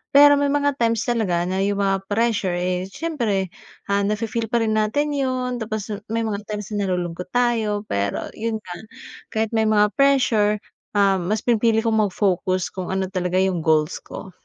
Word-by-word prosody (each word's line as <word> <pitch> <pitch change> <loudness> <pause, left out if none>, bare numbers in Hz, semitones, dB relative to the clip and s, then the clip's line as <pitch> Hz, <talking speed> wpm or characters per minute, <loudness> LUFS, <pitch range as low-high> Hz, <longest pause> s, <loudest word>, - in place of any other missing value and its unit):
Pero 290 0 +8
may 285 - +2
mga 285 -1 0
times 230 -1 +1
talaga 205 -8 0
na 185 +2 -2
'yung 200 +1 0
mga 195 0 0
pressure, 210 -4 0
eh, 180 +1 -1
siyempre, 210 - -2 0.4
ah, 200 - +3
nafe-feel 220 +3 -1
pa 235 0 +1
rin 220 - 0
natin 290 +8 0
'yun. 255 -3 -1
Tapos 215 -1 -4 0.2
may 230 +1 -1
mga 215 -2 -2
times 210 -1 -5
na, 205 -2 -1
nalulungkot 180 -1 -3
tayo 225 -4 +1
pero 100 - -2
'yun 220 -1 -4
nga, 175 - -7 0.5
kahit 220 0 -2
may 220 -1 +2
mga 210 -1 +3
pressure, 245 -7 +4 0.4
ah, 195 -2 +4
mas 205 +5 -2
pinipili 225 -1 +2
kong 225 -1 +2
mag-focus 185 -1 0
kung 185 -2 -5
ano 190 0 -2
talaga 180 -1 -2
'yung 190 -2 0
goals 155 -1 +1
ko. 190 - -10
210 Hz, 175 wpm, -22 LUFS, 190-230 Hz, 0.5 s, Pero